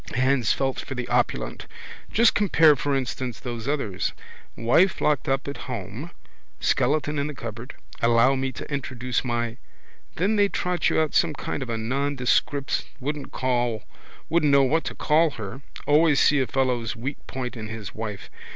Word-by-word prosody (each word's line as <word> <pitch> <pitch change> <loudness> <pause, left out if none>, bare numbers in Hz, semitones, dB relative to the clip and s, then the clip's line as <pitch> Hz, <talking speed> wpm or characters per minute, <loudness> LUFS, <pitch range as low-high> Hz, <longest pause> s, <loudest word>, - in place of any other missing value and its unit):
Hands 130 -2 +2
felt 135 -1 0
for 135 - -6
the 125 -1 -4
opulent. - - 0 0.4
Just 230 +1 +5
compare 165 -7 +5
for 140 +1 -1
instance 125 -2 -3
those 120 -2 -5
others. 135 -11 -1 0.4
Wife 145 +12 +3
locked 150 -4 +1
up 135 +1 0
at 140 - -4
home, 115 - -5 0.5
skeleton 150 +2 +1
in 140 - 0
the 150 - -6
cupboard. 115 +3 -7 0.3
Allow 115 +3 +5
me 135 0 -1
to 140 - -7
introduce 130 -2 -2
my. 120 -1 -2 0.6
Then 200 +5 +1
they 200 -1 +4
trot 180 -2 0
you - - +2
out 155 -2 +1
some 160 -3 +3
kind 140 - -4
of 130 - -4
a 115 - -1
nondescript, 135 +3 0 0.2
wouldn't 145 +1 -4
know 130 +4 0
what 155 +5 +1
to - - -4
call 160 +2 +3
her. 110 +5 -6 0.2
Always 150 0 +4
see 145 - +4
a 130 - +1
fellow's 125 -5 0
weak 130 +5 -4
point 125 -1 -4
in 110 -2 -6
his 110 -2 -7
wife. 105 -2 -6
135 Hz, 160 wpm, -25 LUFS, 120-150 Hz, 0.6 s, Just